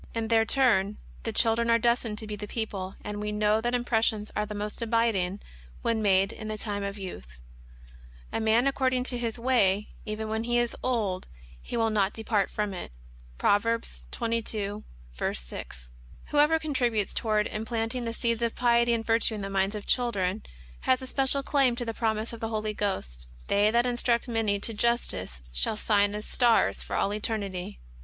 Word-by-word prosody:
In 225 -1 -1
their 225 -1 +4
turn 215 -6 +3 0.2
the 225 - -3
children 230 +1 +2
are 230 - +6
destined 235 -2 +1
to 220 - -2
be 210 -1 -4
the 210 0 -7
people; 195 -4 -3
and 210 0 -4
we 210 0 -2
know 210 +1 +2
that 240 +2 0
impressions 225 -3 +1
are 210 0 0
the 210 - -6
more 210 +1 -3
abiding 220 -5 +1 0.4
when 230 -1 +1
made 195 -1 +3
in 215 - -7
the 215 0 -3
time 205 -1 -3
of 200 +1 -4
youth: 65 - -8 1.0
"A - - 0
young 225 - -2
man 225 +3 +4
according 260 -2 +1
to 250 -1 -2
his 230 -1 -2
way, 210 -5 +2
even 215 0 -4
when 220 +1 -2
he 240 0 +1
is 240 -1 +1
old 210 -7 -1 0.3
he - - -4
will 225 -1 +2
not 205 -2 +2
depart 215 -3 0
from 210 -2 -2
it." 180 - -6 0.5
(Prov. 205 - +4 0.5
22. 215 - -2 0.5
6). - - -8 0.4
Whoever 300 +2 +5
contributes 245 -9 0
toward 215 -2 +1
implant 225 +1 -2
ing 250 -2 -3
the 230 - -2
seeds 235 -1 0
of 235 -1 0
piety 235 -1 +3
and 225 -1 -1
virtue 225 0 +3
in 210 - -5
the 195 0 -4
minds 195 +2 +1
of 210 - -6
chil 245 -2 +2
dren, 190 0 -1 0.4
has 260 0 +1
a - - -4
special 270 +1 +1
claim 270 -4 +3
to 240 0 -4
the 225 - -3
promise 220 0 -1
of 230 - -7
the 225 - -3
Holy 215 -1 -2
Ghost: 65 - -3
" - - -21
They 205 +1 +4
that 235 +2 +3
instruct 240 -1 +1
many 225 -4 +1
to 230 - 0
justice, 205 - 0
shall 65 - +1
shine 205 -1 +2
as 210 - -5
stars 240 -3 +3
for - - -4
all 200 - +1
eternity." 200 - -3
220 Hz, 195 wpm, -28 LUFS, 205-235 Hz, 1.0 s, are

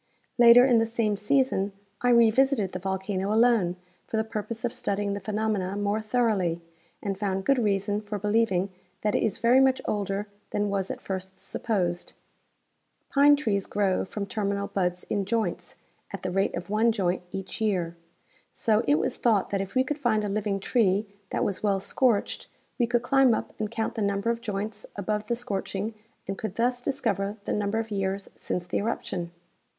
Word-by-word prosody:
Later 240 +1 +9
in 245 -3 +5
the 225 - +1
same 225 -2 0
season 210 -2 +1 0.3
I 245 - +2
revisited 235 -2 +4
the 185 - -4
volcano 190 +1 -2
alone 220 -6 +3 0.3
for 225 - -2
the 220 - +2
purpose 220 +1 -4
of 235 - -2
studying 200 0 -1
the 200 - -3
phenomena 210 -3 -1
more 205 +1 0
thoroughly, 215 -7 +1 0.4
and 195 -2 -2
found 195 -2 -1
good 275 -2 +3
reason 205 -1 0
for 210 0 -4
believing 205 -2 +1 0.3
that 210 -1 +1
it - - +2
is 220 - 0
very 240 +3 +5
much 265 -1 +4
older 205 0 -2 0.2
than 205 -1 -1
was 195 -1 -1
at - - -5
first 190 0 -5
sui^posecl. 180 -6 -2 1.0
Pine 285 +1 +6
trees 210 -9 -1
grow 200 -2 +1
from 200 +2 -4
terminal 200 -1 -2
buds 180 -3 -1
in 200 - -1
joints 225 +3 -2 0.4
at - - -7
the 185 - -2
rate 195 +2 +1
of 175 +2 -6
one 220 +2 +4
joint 185 -5 0
each 195 +2 -6
year; 180 -6 0 0.6
so 220 -1 +1
it 145 - +5
was - - -1
thought 220 -5 +2
that 195 -1 0
if 195 +4 -6
we 255 - +4
could 295 +3 -3
find 220 -6 +2
a - - -1
living 200 -1 -1
tree 200 -1 +2 0.2
that - - -1
Avas 200 - -1
well 200 -2 +2
scorched 215 +2 +1 0.3
we 240 - +3
could 240 0 +1
climb 265 -2 +4
up - - -5
and 215 -1 -1
count 225 0 -2
the 225 - -3
number 200 +2 +1
of 235 0 -4
joints 210 0 -4
above 210 +1 -2
the 235 - +1
scorching 210 -2 -3 0.3
and 195 - -4
could 215 -3 -4
thus 245 +1 +1
dis 270 +2 -2
cover 200 -2 -1
the - - -1
number 205 +1 0
of 225 -1 -3
years 195 0 -2
since 175 - -3
the 175 - -2
eruption. 190 -5 -3
210 Hz, 185 wpm, -27 LUFS, 195-230 Hz, 1.0 s, Later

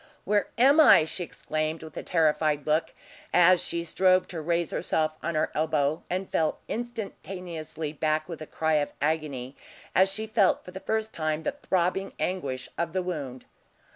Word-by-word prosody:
"Where 205 0 +1
am 275 +6 +6
I?" 295 - +8
she 175 +3 -5
exclaimed, 155 -1 -3
with 160 - -11
a - - -4
terrified 155 -3 +1
look, 155 +2 +1 0.4
as 180 0 +5
she 170 0 -2
strove 185 +2 +3
to 170 -4 -5
raise 170 +1 0
herself 155 -1 0
on 170 - -2
her 155 - +1
elbow, 155 -1 +1
and 185 +2 -2
fell 160 -1 0
instantaneously 180 -9 -5
back 155 0 0
with 165 -3 -7
a 155 - -7
cry 160 0 0
of 145 - -4
agony, 145 -4 -2 0.4
as 190 +1 +4
she 215 +3 -4
felt 215 -4 +2
for 180 - -9
the 190 - -7
first 220 +2 -2
time 155 -1 -2
the - - 0
throbbing 190 -7 -1
anguish 135 -9 -2
of 170 -1 -1
the 185 -1 0
wound. 140 -8 -5
165 Hz, 170 wpm, -27 LUFS, 155-185 Hz, 0.4 s, I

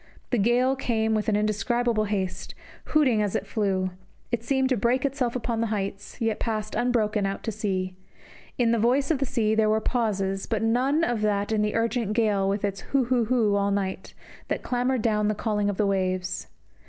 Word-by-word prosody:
The 245 - +2
gale 245 +5 +3
came 220 -4 0
with 215 0 0
an 210 - +2
indescribable 215 +2 +1
haste, 195 -3 -3 0.3
hooting 265 -8 +3
as 205 -2 -1
it - - -1
flew; 190 -3 -1 0.4
it 235 -2 -1
seemed 265 +2 +1
to 260 - +3
break 245 +5 +1
itself 265 -3 -1
upon 235 -2 -1
the 230 - +1
heights, 200 -2 -4
yet 225 -2 0
passed 215 -2 -2
unbroken 215 -4 +1
out 195 - -4
to 225 - -2
sea; 190 -3 -2 0.6
in 235 -2 +3
the 235 - +2
voice 260 +6 +2
of 295 - +1
the 275 - -1
sea 220 -3 +1
there 220 -1 +3
were 215 0 +3
pauses, 200 -5 -1
but 220 -1 -1
none 250 +5 +2
in 240 -7 0
that 205 0 0
of 215 -1 +2
the 210 0 0
urgent 230 -2 0
gale 210 -4 +2
with 200 +1 0
its 200 -1 -3
hoo 275 -2 +1
hoo 245 -1 +1
hoo 220 -3 +2
all 200 0 +1
night, 195 -1 -3 0.3
that - - -2
clamoured 250 -1 0
down 210 -2 +2
the 215 - 0
calling 210 -1 0
of 200 - -3
the 210 - +2
waves. 185 -1 -1
220 Hz, 205 wpm, -26 LUFS, 200-240 Hz, 0.6 s, gale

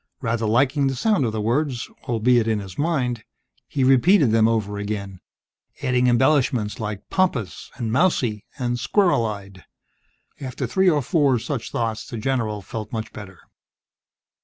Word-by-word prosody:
Rather 115 -3 -1
liking 135 +5 +2
the 135 - -1
sound 205 - +2
of 115 - -1
the 110 - -3
words 120 +3 -1 0.2
albeit 120 0 +3
in 110 -1 +1
his 95 -3 -8
mind 130 -8 -1 0.4
he 135 - -1
repeated 135 - +5
them 110 0 +4
over 105 -3 -1
again, 100 -2 -5 0.6
adding 125 0 +2
embellishments 125 -3 +2
like 105 -2 -5
"pompous" 125 - -1
and 115 -4 -3
"mousy" 125 - +1
and 120 -2 -2
"squirrel 175 - +2
eyed." 100 -3 -8 0.8
After 130 -3 -4
three 190 -1 +3
or 150 -4 +1
four 140 -2 +2
such 120 +1 -4
thoughts, 115 -2 -2
the 120 - -6
general 110 -4 -2
felt 110 +2 -6
much 110 -2 -5
better. 95 -4 -10
120 Hz, 150 wpm, -23 LUFS, 110-135 Hz, 0.8 s, repeated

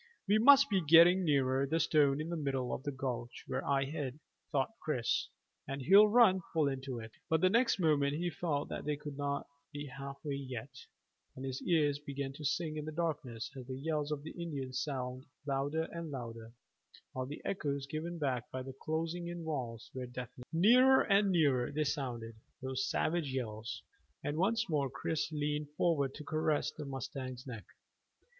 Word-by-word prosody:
"We 210 +2 +4
must 280 +4 +8
be 195 -2 +3
getting 170 +4 +7
nearer 135 -3 +2
the 160 +4 +1
stone 145 -3 +3
in 155 +2 -3
the 170 - -2
middle 135 -5 -1
of - - -3
the 145 +1 -3
gulch 125 -3 -4
where - - -2
I 135 -1 +1
hid," 145 -1 -4 0.3
thought 135 +4 +1
Chris, 125 -7 0 0.4
"and 135 +1 -3
he'll 195 +10 +7
run 210 -4 +6
full 155 -3 +3
into 135 -2 -3
it." 110 -1 -7 0.2
But 160 0 +3
the 185 - +5
next 235 +3 +3
moment 145 -4 +3
he 175 +2 -1
felt 150 -3 -2
that - - -4
they 150 0 0
could 145 0 -7
not 140 0 -2 0.3
be 145 -1 -5
half 135 0 -7
way 145 - -1
yet, 130 -5 -5 0.6
and 130 - -6
his 130 -1 -4
ears 150 -5 +2
began 140 -2 -4
to 150 - -9
sing 155 +2 -1
in 150 - -4
the 155 - -4
darkness 150 -8 -3
as 130 -2 -8
the 130 -1 -5
yells 150 +1 -1
of 145 -1 -3
the 160 - -7
Indians 140 -7 -4
sounded 130 -2 -4 0.2
louder 140 +3 0
and 170 -1 -5
louder, 115 -4 -7 0.6
while 130 0 -3
the 145 - -7
echoes 140 -7 -2
given 160 +4 -4
back 130 -6 -1
by 130 0 -4
the 135 0 -7
closing 165 +5 -3
in 175 -1 -5
walls 125 -8 -4
were 130 -1 -5
deafening. 125 0 -8
Nearer 250 +10 +6
and 200 -1 +3
nearer 145 -9 +3
they 155 +1 0
sounded 120 -6 -3 0.3
those 130 0 -2
savage 160 -4 0
yells 115 -3 -4 0.4
and 145 - -2
once 225 +6 +2
more 145 -5 0
Chris 155 +4 -2
leaned 150 -1 -2
forward 140 -6 +2
to 150 - -8
caress 155 0 0
the 155 -1 -7
mustang's 130 -1 -5
neck. 115 -5 -7
145 Hz, 185 wpm, -34 LUFS, 130-160 Hz, 0.6 s, must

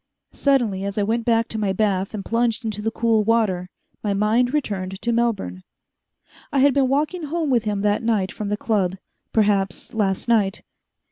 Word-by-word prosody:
Suddenly, 240 -9 +1
as 200 +1 -4
I 205 - +2
went 225 +2 -1
back 230 -1 +2
to 220 - -4
my 200 -2 0
bath 195 0 0
and 200 - -5
plunged 230 0 0
into 210 -2 -3
the 225 - 0
cool 225 -1 +2
water, 205 -5 +1 0.3
my 205 -2 0
mind 220 +5 +2
returned 195 -10 -2
to 235 - +1
Melbourne. 225 - -1 0.9
I - - 0
had 275 +1 +5
been 270 -1 +3
walking 305 +5 0
home 315 -1 -1
with 235 -3 +2
him 205 -2 -1
that 205 0 +1
night 220 -5 0
from 210 -1 -5
the 210 - -1
Club 195 -5 0 0.4
perhaps 200 -4 +1
last 200 -2 0
night. 210 -4 +2
215 Hz, 185 wpm, -22 LUFS, 200-235 Hz, 0.9 s, had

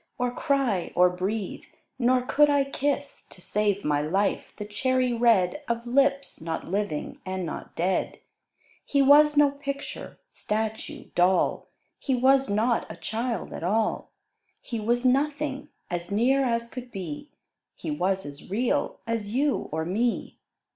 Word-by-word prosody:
Or 245 0 0
cry, 245 -8 0
or 180 0 +5
breathe, 190 +3 -3 0.3
nor 250 0 +3
could 295 +3 +4
I 285 -1 +4
kiss, 280 +1 -2
To - - -11
save 205 +1 0
my 145 -1 +2
life, 195 +7 0
the 210 - -5
cherry 255 +4 +1
red 230 0 +3
Of 235 0 -1
lips, 275 - +1
not 160 0 -4
living 195 -4 -3
and 185 -1 -3
not 165 - -7
dead! 185 +3 -1 0.6
He 280 -1 +2
was 295 +2 +6
no 290 -1 +6
picture, 280 0 -6
statue, 220 +1 -4
doll; 180 +1 +2 0.3
He 265 - 0
was 265 +1 +4
not 225 +4 +1
a - - -7
Child 220 +6 -3
at - - -6
all; 215 +5 0 0.5
He 230 -3 -5
was 240 +3 0
Nothing, 280 +1 +1 0.2
as 175 0 -3
near 260 +6 +3
as 235 -1 0
could 250 0 -8
be, 180 - -6 0.5
He - - -5
was 190 - 0
as 145 +3 -9
real 235 +6 0
as 225 -3 -2
you 275 +5 0
or 160 +1 -2
me. 225 +7 -1
235 Hz, 145 wpm, -26 LUFS, 190-270 Hz, 0.6 s, was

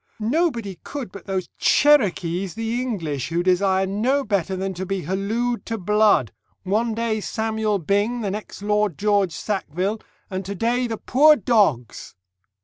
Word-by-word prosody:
Nobody 230 - -1
could 275 -9 -6
but 200 - -11
those 190 -2 -2
Cherokees 195 - +3
the 225 +2 -2
English, 160 - -3
who 170 +1 0
desire 190 +1 +2
no 235 +9 0
better 195 -4 -1
than 190 +1 -3
to 185 +1 -5
be 195 0 -2
halloo'd 220 +7 -2
to 225 - -2
blood 210 - +3 0.3
one 215 +4 0
day 225 -2 -1
Samuel 220 -1 -1
Byng, 205 +7 0
the 200 -3 -2
next 205 0 -7
Lord 210 -5 +1
George 205 -3 +2
Sackville, 195 +2 -3 0.3
and 190 -1 -4
to 200 +2 -5
day 240 +5 0
the 225 -1 -4
poor 300 +7 +5
dogs! 200 - 0
205 Hz, 150 wpm, -22 LUFS, 190-230 Hz, 0.3 s, poor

